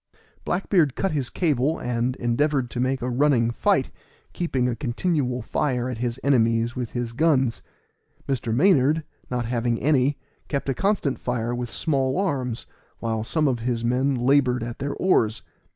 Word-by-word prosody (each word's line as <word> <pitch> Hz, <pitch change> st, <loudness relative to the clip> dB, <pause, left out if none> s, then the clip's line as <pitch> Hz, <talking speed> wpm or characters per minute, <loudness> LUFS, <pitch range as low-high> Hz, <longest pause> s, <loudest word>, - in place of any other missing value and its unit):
Black 185 Hz, -, -2 dB
beard 160 Hz, -9 st, +3 dB
cut 195 Hz, -, 0 dB
his 140 Hz, -5 st, -2 dB
cable, 150 Hz, -2 st, +1 dB
and 125 Hz, +1 st, -1 dB
endeavored 130 Hz, +1 st, 0 dB
to 120 Hz, -, -4 dB
make 130 Hz, 0 st, 0 dB
a 125 Hz, -, -1 dB
running 125 Hz, -3 st, +3 dB
fight, -, -, +1 dB, 0.4 s
keeping 135 Hz, -8 st, 0 dB
a 120 Hz, -, -1 dB
continual 125 Hz, -1 st, -1 dB
fire 125 Hz, 0 st, -1 dB
at 120 Hz, -3 st, -5 dB
his 120 Hz, +1 st, -2 dB
enemies 115 Hz, -3 st, +2 dB
with 125 Hz, -3 st, -4 dB
his 120 Hz, -1 st, -3 dB
guns. 135 Hz, -4 st, +2 dB, 0.7 s
Mr. 130 Hz, -4 st, -1 dB
Maynard, 150 Hz, -, +3 dB, 0.3 s
not 125 Hz, -1 st, -2 dB
having 120 Hz, 0 st, 0 dB
any, 140 Hz, 0 st, +2 dB, 0.3 s
kept 140 Hz, -2 st, -2 dB
a -, -, +2 dB
constant 195 Hz, -6 st, 0 dB
fire 120 Hz, -1 st, -2 dB
with 120 Hz, -1 st, -3 dB
small 135 Hz, +1 st, 0 dB
arms, 130 Hz, -, -1 dB, 0.3 s
while 110 Hz, -1 st, -2 dB
some 150 Hz, +6 st, +1 dB
of 125 Hz, -3 st, 0 dB
his 120 Hz, 0 st, -2 dB
men 130 Hz, +3 st, +1 dB
labored 125 Hz, -1 st, +2 dB
at 120 Hz, 0 st, -6 dB
their 140 Hz, +1 st, -3 dB
oars. 115 Hz, -, +2 dB
125 Hz, 165 wpm, -24 LUFS, 120-145 Hz, 0.7 s, beard